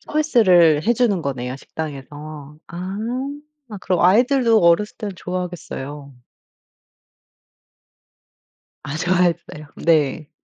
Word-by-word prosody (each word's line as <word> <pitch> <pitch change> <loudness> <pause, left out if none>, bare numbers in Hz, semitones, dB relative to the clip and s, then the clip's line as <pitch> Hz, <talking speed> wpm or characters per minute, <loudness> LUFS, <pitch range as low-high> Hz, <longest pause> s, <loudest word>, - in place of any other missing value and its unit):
서비스를 185 - +3
해 235 - +5
주는 225 -7 +1
거네요 130 -1 -4
식당에서. 150 0 -8
아 185 +3 -6 0.8
그럼 180 -2 0
아이들도 230 +4 +4
어렸을 170 +5 +3
때 210 - -5
좋아하겠어요. 155 -6 -6 2.7
아 140 - -5
좋아했어요. 175 -3 0
네. 155 -2 +1
170 Hz, 220 characters per minute, -21 LUFS, 150-195 Hz, 2.7 s, 해